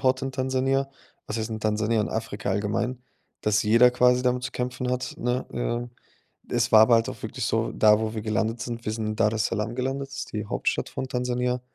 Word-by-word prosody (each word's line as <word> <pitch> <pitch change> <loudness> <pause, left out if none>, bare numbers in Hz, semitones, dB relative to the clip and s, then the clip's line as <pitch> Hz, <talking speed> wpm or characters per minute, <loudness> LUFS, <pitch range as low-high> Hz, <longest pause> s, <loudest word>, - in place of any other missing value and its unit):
dort 130 0 +2
in 135 0 -3
Tansania, 130 +1 0 0.4
was 110 - -2
heißt 110 0 -3
in 110 -1 -4
Tansania, 110 +1 +1
in 105 - -1
Afrika 110 -3 -3
allgemein, 115 +5 -1 0.4
dass 105 -1 +2
jeder 115 +3 +6
quasi 125 0 +4
damit 125 0 +1
zu 125 - -3
kämpfen 125 0 -3
hat, 125 0 -2
ne? 125 +2 -1
Ähm, 120 0 -2 0.6
es - - +1
war 110 -1 +9
aber 115 +1 +6
halt 115 0 +2
auch - - -9
wirklich - - -3
so - - 0
da, 105 0 +5
wo 110 0 -2
wir 110 - -3
gelandet 110 +1 -1
sind 115 0 -5
wir 110 - -1
sind 110 -1 -3
Daressalam 110 +1 0
gelandet, 135 +2 -2
das 140 - -9
ist - - -7
die 105 -1 -3
Hauptstadt - - -1
von 130 - -4
Tansania. 125 0 -1
120 Hz, 210 wpm, -26 LUFS, 110-125 Hz, 0.6 s, war